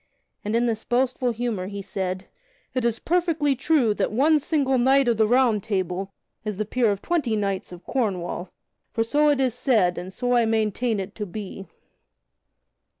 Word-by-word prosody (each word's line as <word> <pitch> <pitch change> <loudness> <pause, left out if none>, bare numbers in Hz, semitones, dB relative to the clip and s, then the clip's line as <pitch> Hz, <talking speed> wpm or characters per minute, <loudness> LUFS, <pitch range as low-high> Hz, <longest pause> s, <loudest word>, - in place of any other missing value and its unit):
And 210 +2 -1
in 235 +1 +3
this 225 -2 -1
boastful 250 +1 +1
humor 230 -5 -2
he 200 0 -6
said: 185 -1 -3 0.5
"It 255 - -1
is 235 -1 +1
perfectly 325 -4 +1
true 270 -4 +2
that - - -1
one 295 +7 +4
single 275 -3 +1
knight 265 +2 +4
of 235 -2 +2
the 220 -1 +4
Round 240 -3 +3
Table 190 -1 -2 0.3
is 210 -3 -4
the 215 - -1
peer 235 +1 +1
of 200 -1 -2
twenty 300 -10 0
knights 200 -3 -2
of 180 0 -10
Cornwall, 185 -7 -2 0.4
for 225 - +1
so 295 +6 +3
it 290 -2 +2
is 260 -3 +2
said 225 -9 +2
and 180 +2 -7
so 245 +5 -1
I 240 -1 +4
maintain 220 0 0
it 190 - -5
to 210 -2 -5
be." 195 0 -7
225 Hz, 180 wpm, -24 LUFS, 200-260 Hz, 0.5 s, one